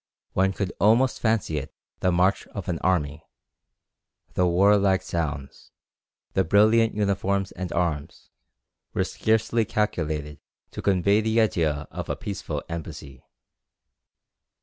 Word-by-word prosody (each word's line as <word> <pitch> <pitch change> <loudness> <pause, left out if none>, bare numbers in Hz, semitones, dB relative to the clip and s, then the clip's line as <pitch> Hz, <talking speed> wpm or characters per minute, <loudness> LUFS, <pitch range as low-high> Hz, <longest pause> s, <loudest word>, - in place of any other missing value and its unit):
One 95 +1 +2
could 95 -1 -3
almost 115 +7 +3
fancy 110 -9 0
it 65 - -10 0.2
the 90 - +2
march 90 +3 +2
of 100 -3 -7
an 85 -3 -2
army. 75 -4 0 1.1
The 90 - +2
warlike 95 +1 +4
sounds, 75 -6 -4 0.6
the - - +3
brilliant 110 +5 +4
uniforms 100 -1 0
and 90 0 -6
arms, 85 -4 -3 0.6
were - - +2
scarcely 110 +1 +1
calculated 80 -10 -2 0.3
to - - -6
convey 100 +2 +3
the 110 +1 +1
idea 80 -9 +1
of - - -6
a - - 0
peaceful 100 -3 -5
embassy. 75 -5 -7
95 Hz, 120 wpm, -25 LUFS, 80-105 Hz, 1.1 s, warlike